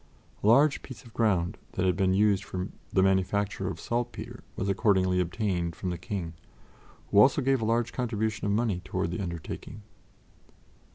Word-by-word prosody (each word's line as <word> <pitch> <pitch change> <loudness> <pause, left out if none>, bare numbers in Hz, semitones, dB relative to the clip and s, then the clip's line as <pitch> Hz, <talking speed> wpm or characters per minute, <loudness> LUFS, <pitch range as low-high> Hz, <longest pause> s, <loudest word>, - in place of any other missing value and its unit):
A - - +2
large 140 +6 +5
piece 130 - -10
of 115 - -15
ground 100 -4 +1
that 95 - 0
had 90 -2 +3
been 95 -1 +2
used 100 -1 +3
for 95 -2 -4 0.2
the 95 - +3
manufacture 95 +1 +1
of 90 -4 -4
saltpetre 120 +4 -4
was 95 - -2
accordingly 95 -2 +2
obtained 90 -2 -1
from 90 - -3
the 90 - -3
King, 90 -5 -4 0.8
who 100 - +5
also 135 +7 +6
gave 135 -2 +2
a - - 0
large 115 +1 +1
contribution 110 -4 -1
of - - +1
money 105 -4 0
toward 85 - -2
the 90 - -3
undertaking. 85 +4 -6
100 Hz, 170 wpm, -28 LUFS, 95-115 Hz, 0.8 s, also